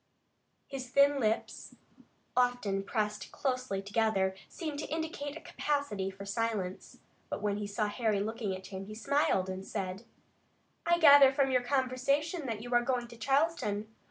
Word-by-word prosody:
His 260 Hz, -2 st, -6 dB
thin 280 Hz, +2 st, +4 dB
lips, 220 Hz, -3 st, -2 dB, 0.6 s
often 245 Hz, -6 st, +1 dB
pressed 210 Hz, +1 st, -2 dB
closely 250 Hz, -7 st, -2 dB
together, 200 Hz, -2 st, +1 dB, 0.2 s
seemed 305 Hz, -4 st, -5 dB
to -, -, -4 dB
indicate 315 Hz, -1 st, -3 dB
a -, -, -11 dB
capacity 285 Hz, -14 st, -2 dB
for 195 Hz, +1 st, -9 dB
silence, 205 Hz, -3 st, -3 dB, 0.3 s
but -, -, -4 dB
when 205 Hz, -1 st, 0 dB
he 205 Hz, -1 st, -3 dB
saw 210 Hz, +2 st, -1 dB
Harry 210 Hz, -1 st, 0 dB
looking 210 Hz, -1 st, -2 dB
at 190 Hz, 0 st, -10 dB
him 190 Hz, 0 st, -6 dB
he 215 Hz, -, -8 dB
smiled 250 Hz, -6 st, +1 dB
and 190 Hz, 0 st, -5 dB
said: 190 Hz, +2 st, -4 dB, 0.8 s
"I 345 Hz, 0 st, +5 dB
gather 285 Hz, -4 st, +9 dB
from 270 Hz, 0 st, +2 dB
your 255 Hz, -1 st, +3 dB
conversation 275 Hz, +5 st, 0 dB
that 225 Hz, -2 st, -3 dB
you 245 Hz, 0 st, -5 dB
are 240 Hz, -, +5 dB
going 240 Hz, -1 st, -1 dB
to 240 Hz, -, -11 dB
Charleston. 230 Hz, -4 st, 0 dB
240 Hz, 155 wpm, -31 LUFS, 205-280 Hz, 0.8 s, gather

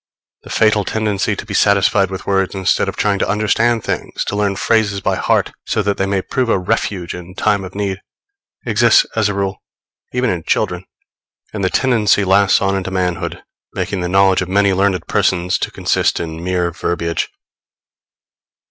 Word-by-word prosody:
The -, -, -14 dB
fatal 110 Hz, -1 st, +2 dB
tendency 105 Hz, -2 st, -1 dB
to -, -, -7 dB
be -, -, -7 dB
satisfied 100 Hz, -1 st, +3 dB
with 95 Hz, -1 st, -6 dB
words 95 Hz, -1 st, 0 dB
instead 95 Hz, -1 st, +1 dB
of -, -, -6 dB
trying 100 Hz, -2 st, 0 dB
to -, -, 0 dB
understand 110 Hz, +3 st, +1 dB
things -, -, -3 dB
to -, -, -3 dB
learn 100 Hz, -1 st, 0 dB
phrases 105 Hz, -1 st, +1 dB
by 95 Hz, 0 st, 0 dB
heart, -, -, +1 dB, 0.2 s
so -, -, 0 dB
that 100 Hz, -1 st, 0 dB
they 95 Hz, -, 0 dB
may 95 Hz, -1 st, -1 dB
prove 130 Hz, -3 st, -1 dB
a -, -, +3 dB
refuge 90 Hz, 0 st, -2 dB
in 90 Hz, +1 st, -10 dB
time 105 Hz, -2 st, +1 dB
of 95 Hz, +1 st, -9 dB
need, 100 Hz, -2 st, -3 dB, 0.6 s
exists, -, -, +4 dB
as 105 Hz, -, +2 dB
a 100 Hz, -, -3 dB
rule, 100 Hz, -1 st, -2 dB, 0.5 s
even 125 Hz, 0 st, 0 dB
in 90 Hz, -2 st, -2 dB
children; -, -, -1 dB, 0.7 s
and 105 Hz, -2 st, -3 dB
the 95 Hz, -, +2 dB
tendency 110 Hz, -5 st, +2 dB
lasts 100 Hz, +1 st, +3 dB
on 95 Hz, 0 st, +1 dB
into 95 Hz, -1 st, -3 dB
manhood, 90 Hz, -2 st, -2 dB, 0.3 s
making 100 Hz, -3 st, -2 dB
the 90 Hz, -, -2 dB
knowledge 95 Hz, 0 st, +4 dB
of 90 Hz, -, -4 dB
many 100 Hz, 0 st, +3 dB
learned 95 Hz, -2 st, +1 dB
persons 90 Hz, 0 st, +1 dB
to -, -, -2 dB
consist -, -, 0 dB
in 80 Hz, 0 st, -5 dB
mere 90 Hz, -1 st, 0 dB
verbiage. 85 Hz, -1 st, -2 dB
95 Hz, 180 wpm, -17 LUFS, 95-105 Hz, 0.7 s, exists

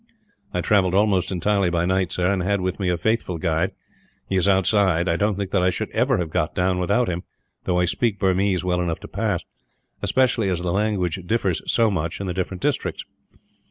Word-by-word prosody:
"I 90 Hz, -, -1 dB
travelled 95 Hz, -2 st, +2 dB
almost 100 Hz, -3 st, +2 dB
entirely 95 Hz, +1 st, +1 dB
by 85 Hz, 0 st, 0 dB
night, 95 Hz, 0 st, 0 dB
sir; 90 Hz, +1 st, +1 dB
and 95 Hz, -, -1 dB
I 90 Hz, -, -2 dB
had 100 Hz, 0 st, +1 dB
with 90 Hz, +1 st, -2 dB
me 95 Hz, -2 st, 0 dB
a 90 Hz, -, +1 dB
faithful 100 Hz, -1 st, -1 dB
guide. 80 Hz, +3 st, 0 dB, 0.6 s
He 95 Hz, -, -2 dB
is 95 Hz, +1 st, +2 dB
outside. 95 Hz, -2 st, +3 dB
I 85 Hz, -, +2 dB
don't 105 Hz, +3 st, +1 dB
think 100 Hz, -1 st, -4 dB
that 95 Hz, -, +2 dB
I 90 Hz, -, +3 dB
should 110 Hz, +4 st, -3 dB
ever 125 Hz, +2 st, +2 dB
have 85 Hz, -4 st, -3 dB
got 75 Hz, -, -1 dB
down 90 Hz, 0 st, +1 dB
without 100 Hz, +7 st, +1 dB
him, 90 Hz, -1 st, -2 dB, 0.4 s
though 90 Hz, -, +1 dB
I 90 Hz, -, +3 dB
speak 105 Hz, +4 st, 0 dB
Burmese 95 Hz, -1 st, +1 dB
well 90 Hz, -1 st, 0 dB
enough 85 Hz, -2 st, -2 dB
to -, -, -8 dB
pass 100 Hz, -4 st, -2 dB, 0.6 s
especially 125 Hz, -5 st, +2 dB
as 90 Hz, -2 st, -1 dB
the 90 Hz, -, -1 dB
language 100 Hz, -4 st, 0 dB
differs 100 Hz, -5 st, 0 dB
so 115 Hz, -2 st, +3 dB
much, 85 Hz, -3 st, -2 dB
in 100 Hz, -, -4 dB
the 90 Hz, -, -2 dB
different 95 Hz, 0 st, -3 dB
districts." -, -, -1 dB
95 Hz, 215 wpm, -23 LUFS, 90-100 Hz, 0.6 s, outside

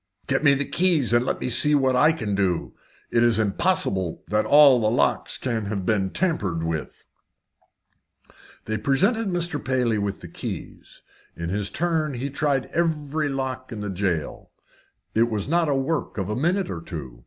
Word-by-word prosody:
"Get 135 Hz, +2 st, 0 dB
me 140 Hz, -2 st, +6 dB
the 140 Hz, +1 st, -1 dB
keys 165 Hz, -9 st, +1 dB
and 120 Hz, 0 st, +4 dB
let 130 Hz, -, -2 dB
me 125 Hz, -, -3 dB
see 150 Hz, +5 st, +4 dB
what 130 Hz, -2 st, +2 dB
I 150 Hz, +5 st, +5 dB
can 110 Hz, -11 st, -3 dB
do. 95 Hz, -3 st, 0 dB, 0.4 s
It 115 Hz, -, +3 dB
is 120 Hz, -1 st, +3 dB
impossible 100 Hz, -, 0 dB
that 105 Hz, 0 st, +1 dB
all 140 Hz, -4 st, +7 dB
the 110 Hz, -, +2 dB
locks 120 Hz, -, +1 dB
can 115 Hz, -4 st, -2 dB
have 100 Hz, -2 st, -3 dB
been 95 Hz, -2 st, +1 dB
tampered 95 Hz, -, -1 dB
with." 80 Hz, -2 st, -4 dB, 1.6 s
They 110 Hz, -1 st, -2 dB
presented 195 Hz, -, +1 dB
Mr. 175 Hz, -4 st, -1 dB
Paley 125 Hz, -4 st, +1 dB
with 100 Hz, -1 st, -3 dB
the -, -, -8 dB
keys. -, -, -8 dB, 0.3 s
In 85 Hz, 0 st, -5 dB
his 100 Hz, +1 st, -1 dB
turn 160 Hz, -4 st, -1 dB
he 135 Hz, +3 st, -4 dB
tried 140 Hz, -2 st, 0 dB
every 155 Hz, -2 st, 0 dB
lock 130 Hz, -1 st, -4 dB
in 110 Hz, -2 st, -6 dB
the 105 Hz, -1 st, -3 dB
jail 90 Hz, -5 st, -3 dB, 0.6 s
This 115 Hz, +1 st, +4 dB
was 105 Hz, -2 st, -2 dB
not 165 Hz, 0 st, +2 dB
a 140 Hz, -, +2 dB
work 135 Hz, +1 st, -2 dB
of 95 Hz, -1 st, -2 dB
a 105 Hz, -, -1 dB
minute 175 Hz, -, 0 dB
or 85 Hz, -, -5 dB
two. 70 Hz, -8 st, -8 dB
125 Hz, 175 wpm, -24 LUFS, 100-150 Hz, 1.6 s, all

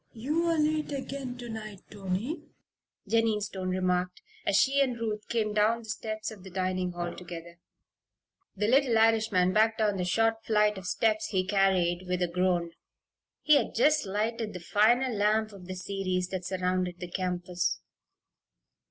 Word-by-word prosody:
"You're 320 Hz, +8 st, 0 dB
late 305 Hz, 0 st, +1 dB
again 270 Hz, -2 st, -5 dB
to 245 Hz, -1 st, -8 dB
night, 215 Hz, -3 st, -7 dB
Tony," 205 Hz, -, -3 dB, 0.7 s
Jennie 225 Hz, -2 st, +2 dB
Stone 190 Hz, -2 st, -4 dB
remarked, 180 Hz, -1 st, -1 dB, 0.2 s
as 200 Hz, -, +3 dB
she 275 Hz, +1 st, +3 dB
and 250 Hz, -4 st, 0 dB
Ruth 215 Hz, -2 st, -3 dB
came 215 Hz, -2 st, 0 dB
down 220 Hz, +2 st, +2 dB
the 220 Hz, -, -12 dB
steps 215 Hz, 0 st, -4 dB
of 205 Hz, -4 st, -12 dB
the 190 Hz, -, -9 dB
dining 185 Hz, -1 st, -1 dB
hall 175 Hz, 0 st, -4 dB
together. 170 Hz, -1 st, -9 dB, 1.0 s
The 210 Hz, +1 st, 0 dB
little 255 Hz, -1 st, +4 dB
Irishman 220 Hz, -5 st, +3 dB
backed 220 Hz, +1 st, +3 dB
down 210 Hz, -3 st, +1 dB
the 180 Hz, -, -1 dB
short 225 Hz, +4 st, +1 dB
flight 210 Hz, -2 st, +2 dB
of 180 Hz, -, -8 dB
steps 215 Hz, +2 st, +1 dB
he 185 Hz, -3 st, 0 dB
carried, 185 Hz, -2 st, +2 dB
with 180 Hz, 0 st, 0 dB
a -, -, +1 dB
groan. 175 Hz, -1 st, 0 dB, 0.7 s
He 305 Hz, -1 st, +6 dB
had 245 Hz, -, -2 dB
just 295 Hz, 0 st, +3 dB
lighted 215 Hz, +2 st, -2 dB
the 180 Hz, -, -6 dB
final 235 Hz, +8 st, +3 dB
lamp 215 Hz, +1 st, +2 dB
of 185 Hz, -3 st, -12 dB
the 185 Hz, -, -5 dB
series 185 Hz, -1 st, -2 dB
that 185 Hz, -1 st, -4 dB
surrounded 180 Hz, -1 st, -1 dB
the 180 Hz, -, -5 dB
campus. 180 Hz, -1 st, -2 dB
210 Hz, 160 wpm, -29 LUFS, 185-225 Hz, 1.0 s, He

